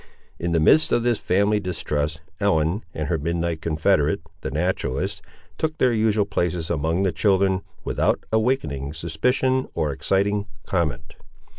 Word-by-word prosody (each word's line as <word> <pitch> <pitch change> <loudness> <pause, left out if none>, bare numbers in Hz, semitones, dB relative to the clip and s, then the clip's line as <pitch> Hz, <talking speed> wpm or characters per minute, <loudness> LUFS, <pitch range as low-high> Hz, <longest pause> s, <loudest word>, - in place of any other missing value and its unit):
In 85 0 -2
the 85 - +3
midst 155 - +5
of 120 - +2
this 120 -2 +1
family 100 +3 +2
distrust, 80 -5 -2 0.2
Ellen 95 0 +1
and 75 -3 -4
her 80 0 0
midnight 85 +1 -2
confederate, 80 -1 +1 0.2
the - - -3
naturalist, 75 -3 -1 0.4
took 155 0 -1
their 125 -2 +3
usual 110 -2 +2
places 85 -4 -1
among 80 +3 0
the 95 - +2
children, 95 +2 +2 0.2
without - - +1
awakening 80 - 0
suspicion 125 - 0
or 75 - 0
exciting 100 +8 0 0.2
comment. 85 -6 -2
90 Hz, 140 wpm, -23 LUFS, 80-105 Hz, 0.4 s, midst